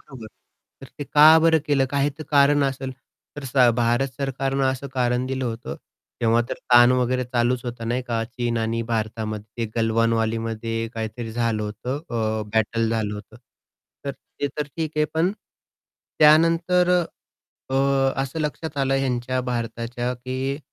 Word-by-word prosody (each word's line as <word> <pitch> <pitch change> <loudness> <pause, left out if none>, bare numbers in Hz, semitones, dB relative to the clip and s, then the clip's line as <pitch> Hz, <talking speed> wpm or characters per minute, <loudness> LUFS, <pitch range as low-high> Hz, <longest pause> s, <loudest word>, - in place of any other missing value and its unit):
बरोबर. 130 -6 -11 0.5
तर 135 - -11
ते 145 - -4
का 150 +2 +6
बरं 160 0 +4
केलं? 140 -2 +3
काही 140 0 +1
तर - - -5
कारण 145 0 +4
असेल. 135 -1 -2 0.5
तर 145 - -7
स 125 -1 +4
भारत 120 +3 +2
सरकारनं 135 0 -1
असं 135 +1 -5
कारण 125 0 +1
दिलं 130 0 -2
होतं. 115 0 -5 0.4
तेव्हा 115 0 +3
तर - - -2 0.2
ताण 120 +1 +8
वगैरे 125 +1 0
चालूच 120 0 0
होतं, 115 -2 -5
नाही 125 +2 -1
का. 115 -2 -2
चीन 120 0 -3
आणि 115 +1 -1
भारतामध्ये 110 0 -3
ते 110 - -7
गलवान 115 0 +2
वॅलीमध्ये 115 0 -2
काहीतरी 115 +1 -5
झालं 115 -2 0
होतं. 110 +6 -4
अ, 110 -2 -1
बॅटल 110 +1 +1
झालं 110 -2 -1
होतं. 105 +1 -11 0.7
तर 140 - -1
ते 145 - -6
तर 150 - -1
ठीक 160 -2 -2
आहे. 150 - +3
पण, 170 +4 +2 0.9
त्यानंतर 165 +4 +5 0.8
अ, - - 0 0.5
असं 135 +4 -5
लक्षात 155 +1 -4
आलं 135 0 +1
ह्यांच्या 130 -1 -1
भारताच्या, 120 0 -3
की 130 +2 -4
125 Hz, 155 wpm, -23 LUFS, 115-135 Hz, 0.9 s, ताण